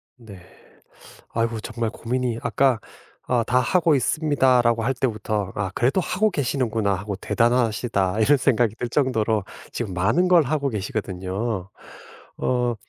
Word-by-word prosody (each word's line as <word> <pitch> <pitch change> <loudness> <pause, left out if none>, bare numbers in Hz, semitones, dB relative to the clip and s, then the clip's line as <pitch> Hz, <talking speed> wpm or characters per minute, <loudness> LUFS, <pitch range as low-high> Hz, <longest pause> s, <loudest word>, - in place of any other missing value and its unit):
네. 110 -7 -13 0.9
아이고 115 -1 -1
정말 115 -1 -3
고민이 120 0 -2
아까 130 -5 +2 0.5
"아 120 -2 +1
다 125 +1 +3
하고 165 +2 +2
있습니다."라고 130 -5 +2
할 135 +2 +1
때부터 110 -6 -2
'아 95 -2 -2
그래도 130 +10 +2
하고 205 +5 +1
계시는구나.' 120 - 0
하고 100 +1 -4
'대단하시다.' 115 -3 +1
이런 145 +7 +5
생각이 120 -4 +2
들 120 0 -3
정도로 110 -6 +1 0.3
지금 105 -7 -4
많은 170 - +2
걸 175 -3 +6
하고 140 0 -1
계시거든요. 100 -1 -3 0.7
어 125 -1 0
120 Hz, 305 characters per minute, -23 LUFS, 105-130 Hz, 0.9 s, 걸